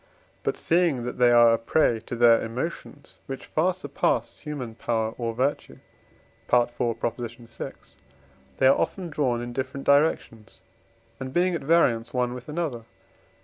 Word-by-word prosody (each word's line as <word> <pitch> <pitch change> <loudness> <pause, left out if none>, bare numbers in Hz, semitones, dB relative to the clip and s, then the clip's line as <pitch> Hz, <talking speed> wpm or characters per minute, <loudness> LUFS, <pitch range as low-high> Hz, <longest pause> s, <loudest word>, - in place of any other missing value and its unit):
But - - -2
seeing 165 -7 +1
that 125 +1 -5
they 125 -1 +6
are 120 -1 +7
a 115 - +1
prey 115 -1 +2
to - - -4
their 115 -1 +5
emotions, 140 +4 -6
which 135 -1 -6
far 170 +4 +1
surpass 160 -6 -2
human 140 -7 -6
power 110 -1 -1
or 115 -2 -3
virtue 135 +4 -2 0.7
(IV. 120 -1 +4
vi.), 120 0 -4 0.9
they - - +2
are 135 - +5
often 180 -4 -2
drawn 125 -5 0
in 120 0 -6
different 130 +2 -4
directions, 140 -7 +1 0.6
and 130 0 -5
being 180 +4 +2
at 170 - -2
variance 130 -7 +2
one 125 -1 0
with 125 +3 -9
another 150 -6 -2
(IV. 115 - -21
125 Hz, 150 wpm, -25 LUFS, 120-150 Hz, 0.9 s, are